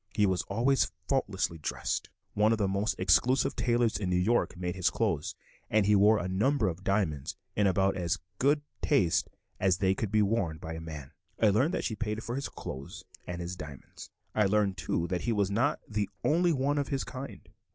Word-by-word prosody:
He 105 -1 +4
was 95 -2 +1
always 120 +7 +2 0.2
faultlessly 95 - 0
dressed; 75 - -3 0.2
one 105 +2 +3
of 115 - +2
the 100 -2 +1
most 100 +4 -1
exclusive 125 +10 +3
tailors 120 -4 +1
in 95 -3 -2
New 90 - +1
York 95 +1 +1
made 90 0 -3
his 95 -1 +2
clothes, 100 -10 -1 0.3
and 105 -1 +3
he 105 +1 +4
wore 105 +2 +6
a 90 - -2
number 110 +6 +1
of 90 +1 -4
diamonds 85 -9 0 0.2
in 105 -1 +3
about 95 +1 +2
as 85 0 -1 0.2
good 145 +3 +3 0.2
taste 95 - +2 0.3
as 95 -1 +3
they 95 -1 +2
could 100 0 -3
be 105 0 +4
worn 100 -6 0
in - - -14
by 80 - -6
a 80 - -6
man. 75 -4 -8 0.3
I 110 - +5
learned 130 - +2
that - - -2
she 110 - -1
paid 110 0 -3
for 120 - -4
his 135 +2 -3
clothes 65 +1 -8 0.2
and 90 0 -4
his 85 +1 -4
diamonds. 75 -5 -10 0.2
I 105 -2 +3
learned, 100 -1 +2
too, 85 -2 -1
that 90 -1 -1
he 120 - -1
was 100 -3 +1
not 130 +9 +1
the 105 -3 -2
only 170 +3 +3
one 145 0 +1
of 140 - -1
his 135 -2 -1
kind. 130 +2 -8
100 Hz, 210 wpm, -30 LUFS, 90-115 Hz, 0.3 s, wore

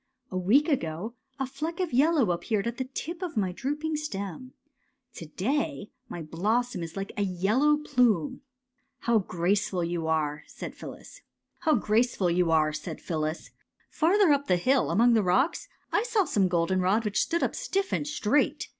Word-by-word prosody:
'' 255 0 -44
A - - -5
week 235 - +4
ago 205 - -2 0.2
a 270 - -1
fleck 310 +6 -5
of 360 -6 -1
yellow 280 - +4
appeared 200 +4 -1
at 235 0 -3
the 260 - -2
tip 335 +6 -5
of 355 -9 -4
my 190 -3 +1
drooping 295 - -3
stem. 225 - -5 0.6
To 165 - -9
day 270 - -2 0.2
my 170 - -6
blossom 215 +9 -1
is 165 +2 -6
like 195 0 -4
a - - 0
yellow 205 +11 +2
plume." 240 - +1
'^ - - -22 0.6
How 235 -2 +3
graceful 185 0 0
you 170 -1 -2
are! 155 -2 0
" - - -28
said - - -6
Phyllis. - - -11 0.4
'^ 170 - +1 0.5
Farther 355 +2 +5
up 285 0 +2
the 180 - +3
hill, 260 +9 +2
among 235 +2 +4
the 225 - +4
rocks, 260 - +1 0.2
I - - +3
saw 450 -4 +1
some 200 - +2
goldenrod 185 +5 +1
which 210 -1 +1
stood 340 - 0
up - - 0
stiff 390 -6 -2
and 295 - -1
straight. 295 -2 0
220 Hz, 165 wpm, -27 LUFS, 180-290 Hz, 0.6 s, Farther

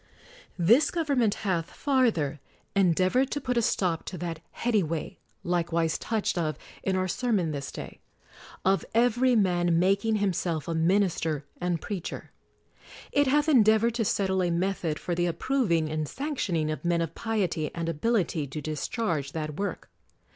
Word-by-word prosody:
This 225 - +5
government 280 - +1
hath, 170 -4 0
farther, 225 - +1 0.4
endeavored 190 - +3
to 290 - -2
put 250 -3 -2
a 235 - +3
stop 180 -6 0
to 185 - -6
that 170 -2 -4
heady 230 -3 +1
way 160 -2 -4 0.2
(likewise 170 -2 0
touched 220 -5 -1
of 155 -2 -1 0.2
in 190 - 0
our 185 0 0
sermon 205 -6 0
this 140 -2 -5
day) - - -8 0.7
of 195 +1 +3
every 245 +2 +4
man 175 -5 +2
making 200 +5 +2
himself 180 -6 -1
a 165 - -1
minister 165 -3 +1
and 175 -1 -1
preacher. 190 -5 -5 0.8
It 285 -1 +3
hath 295 +3 +3
en 265 -8 +6
deavored 220 +2 +3
to 230 -1 0
settle 190 -2 +1
a 175 - +1
method 170 -2 -1
for 175 - -3
the 175 +1 +1
approving 170 - +1
and 155 0 -2
sanctioning 195 - -1
of 155 - -5
men 170 -1 +1
of 165 -1 -3
piety 190 -9 -1
and 170 -1 -3
ability 165 -3 0
to 140 +3 -6
discharge 155 - -2
that 155 0 -4
work. 200 0 -4
185 Hz, 155 wpm, -27 LUFS, 165-225 Hz, 0.8 s, en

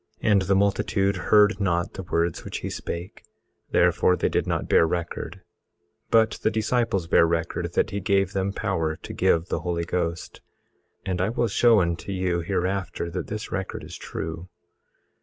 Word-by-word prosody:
18:37 110 - +3
And 100 -2 +5
the 95 +1 +1
multitude 100 0 +1
heard 105 +2 +4
not 85 -3 0
the 95 - -6
words 85 -2 -1
which - - -5
he - - -4
spake, 85 +2 -6 0.5
therefore 90 - +3
they - - 0
did - - 0
not - - -1
bear 80 - +4
record; 85 +1 -4 0.7
but 110 -1 +3
the - - +2
disciples 110 -3 0
bare 85 0 +4
record 85 +1 -2
that 100 - +1
he 100 - -2
gave 100 -1 +1
them 95 0 0
power 85 -6 -1
to - - -9
give 85 +2 +2
the - - -1
Holy 85 -1 -2
Ghost. 85 -1 -3 0.6
And 90 -1 -1
I 95 - +1
will 120 +1 0
show 115 0 +4
unto 85 +3 -2
you 90 -2 0
hereafter 90 0 -2
that - - -4
this 105 0 -5
record 95 0 -4
is - - -9
true. 80 +3 -6
95 Hz, 175 wpm, -25 LUFS, 85-100 Hz, 0.7 s, And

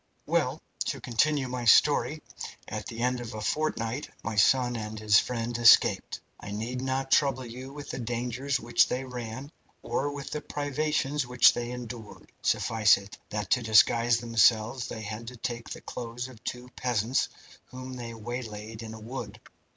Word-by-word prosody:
"Well, - - +1 0.3
to - - -2
continue 135 +3 +1
my 125 -1 -4
story 110 - +4 0.4
at - - -5
the 115 0 -6
end 125 0 +1
of 120 -2 -7
a - - -4
fortnight 125 -1 -1
my 115 - -3
son 120 +4 +4
and 110 -1 -5
his 105 -1 +5
friend 120 -1 -3
escaped. 120 -1 +5 0.2
I - - -8
need 115 +5 -3
not 135 0 -2
trouble 130 -2 +3
you 125 +3 -8
with 145 0 -8
the - - -5
dangers 125 +3 -2
which 115 +1 +3
they 130 +1 -2
ran, 125 +2 -6 0.3
or 145 +2 -1
with 140 -1 -7
the 150 - -3
privations 145 -1 -1
which 125 -1 +6
they 120 0 -3
endured. 120 -3 -8
Suffice 110 -2 +4
it 100 +1 -11
that 105 0 -4
to 125 - +4
disguise 115 +1 +5
themselves 115 +1 +3
they 110 - -6
had 110 +2 -6
to 125 +1 -8
take 120 0 -4
the - - -7
clothes 120 +1 -5
of 120 -4 -15
two 125 0 -5
peasants, 120 0 0 0.4
whom 130 0 -8
they 120 -2 -6
waylaid 110 -1 -6
in 110 -1 -7
a - - -10
wood. 110 -2 -7
120 Hz, 170 wpm, -28 LUFS, 115-130 Hz, 0.4 s, which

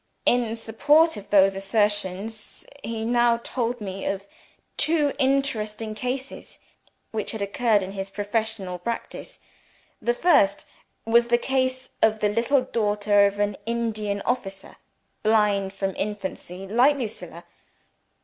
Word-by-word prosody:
In 240 -2 +2
support 290 +9 +3
of 205 -1 -10
those 195 -1 +5
assertions, 205 +1 -1 0.2
he 225 -1 -3
now 240 0 +3
told 240 0 -3
me 195 -2 -6
of 195 0 -2 0.5
two 305 -3 +2
interesting 230 -6 0
cases 255 +4 -5 0.5
which 220 0 -3
had 220 - -5
occurred 210 0 +2
in 185 - -6
his 195 0 -5
professional 205 -3 -3
practice. 235 - -5 0.6
The 240 0 +1
first 240 - +3 0.4
was 235 +1 +4
the 240 0 +4
case 260 0 -1
of 220 -1 +4
the 210 - +2
little 240 +5 +2
daughter 205 -4 +2
of 200 0 -4
an 205 -1 0
Indian 215 -3 -2
officer 195 -6 -3 0.4
blind 210 -3 +2
from 195 -1 -3
infancy 195 -2 -5
like 245 +8 +4
Lucilla. 225 -5 -6
220 Hz, 125 wpm, -25 LUFS, 200-240 Hz, 0.6 s, those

